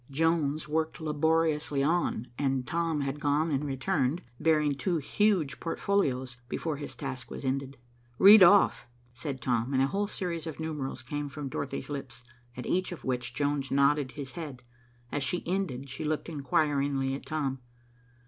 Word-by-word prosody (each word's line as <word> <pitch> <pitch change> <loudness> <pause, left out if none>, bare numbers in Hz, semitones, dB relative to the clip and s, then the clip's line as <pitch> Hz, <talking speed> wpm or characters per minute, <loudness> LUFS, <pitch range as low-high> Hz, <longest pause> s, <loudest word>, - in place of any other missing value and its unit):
Jones 155 0 +1
worked 160 +2 -1
laboriously 155 -2 +1
on, 160 -6 +1
and 135 -2 0
Tom 165 +1 0
had 140 +1 -2
gone 150 +2 +1
and 140 0 0
returned, 140 +2 0 0.2
bearing 150 -2 +3
two 170 +5 -1
huge 160 0 +1
portfolios, 135 -9 0
before 155 +1 -2
his 145 - -7
task 130 -4 -6
was - - -7
ended. 135 +1 -2 0.4
"Read 205 +2 +9
off," 190 -4 +6 0.3
said 130 +2 -5
Tom, 125 +1 0
and 130 - +4
a - - +5
whole 200 +8 -1
series 175 -5 -4
of 160 - -6
numerals 150 -6 -4
came 145 +3 -4
from 140 -1 -5
Dorothy's 135 +1 -4
lips, 135 -3 -6 0.3
at 125 - -5
each 185 +1 0
of 175 - -8
which 125 -1 -2
Jones 145 -2 0
nodded 140 -1 +2
his 140 -3 -6
head. 140 -5 -7 0.5
As 145 - -1
she 140 +6 -1
ended 170 -8 -2
she 135 - -6
looked 155 +2 -2
inquiringly 140 -2 +1
at 135 - -6
Tom. 140 -4 -2
145 Hz, 160 wpm, -29 LUFS, 135-160 Hz, 0.5 s, Read